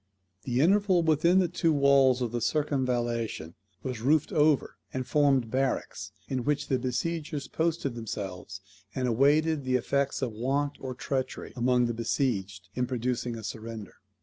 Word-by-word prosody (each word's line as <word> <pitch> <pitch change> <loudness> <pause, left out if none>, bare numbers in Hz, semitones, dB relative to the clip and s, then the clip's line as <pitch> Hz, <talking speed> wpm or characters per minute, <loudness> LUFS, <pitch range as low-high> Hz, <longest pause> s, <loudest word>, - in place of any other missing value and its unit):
The 125 0 +1
interval 190 +1 +4
within 160 +3 +3
the 185 -2 +4
two 170 -1 +1
walls 140 -3 +4
of 120 - -2
the 120 0 -2
circumvallation 120 - -1 0.3
was 125 -4 -4
roofed 150 +4 +2
over, 150 -2 +2
and 130 -1 -3
formed 135 -3 +2
barracks, 130 -6 -2 0.2
in 130 -2 -2
which 145 +1 -1
the 130 -3 +2
besiegers 145 +4 -3
posted 160 -4 -1
themselves, 100 -5 -6 0.3
and 130 -1 0
awaited 145 +5 +3
the 130 0 0
effects 140 +2 0
of 125 - -1
want 135 +6 -1
or 130 -1 -5
treachery 130 +1 -3
among 125 0 +2
the 120 - -1
besieged 100 -6 -2
in 125 +1 -1
producing 125 -1 -2
a 110 - -8
surrender. 110 0 -7
130 Hz, 150 wpm, -28 LUFS, 120-145 Hz, 0.3 s, interval